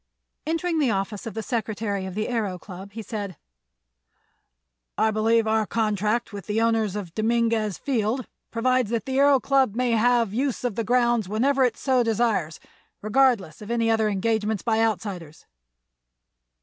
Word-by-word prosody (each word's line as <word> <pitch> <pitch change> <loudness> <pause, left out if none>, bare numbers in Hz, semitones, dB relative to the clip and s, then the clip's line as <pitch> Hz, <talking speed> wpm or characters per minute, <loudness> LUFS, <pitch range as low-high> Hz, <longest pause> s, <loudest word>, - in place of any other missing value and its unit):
Entering 330 +1 0
the 280 -5 +2
office 200 +1 -2
of 220 - -7
the 220 - -3
secretary 210 -3 -2
of 185 - -7
the 215 +1 -1
Aëro 210 -7 -2
Club 195 +2 -10
he 225 0 -6
said: 205 -5 -5 1.6
"I 220 - +3
believe 225 +1 +2
our 220 -1 +1
contract 215 +1 0
with 200 -4 -8
the 210 +1 0
owners 225 -3 +1
of 190 -5 -5
Dominguez 225 -2 +1
Field 245 -1 -1 0.2
provides 255 0 +1
that 230 -1 -2
the 265 0 -2
Aëro 280 -1 +5
Club 265 -5 +2
may 250 0 +1
have 230 -1 +3
the 215 - -4
use 265 -1 -1
of 245 -3 -1
the 230 - -2
grounds 240 -3 +2
whenever 265 +6 +2
it 245 -3 +1
so 260 -2 +2
desires, 220 -8 0 0.4
regardless 215 - +2
of 210 - -9
any 230 -1 +1
other 220 -1 +2
engagements 215 +1 -1
by 225 -2 +1
outsiders." 190 -8 -3
225 Hz, 160 wpm, -24 LUFS, 210-240 Hz, 1.6 s, Aëro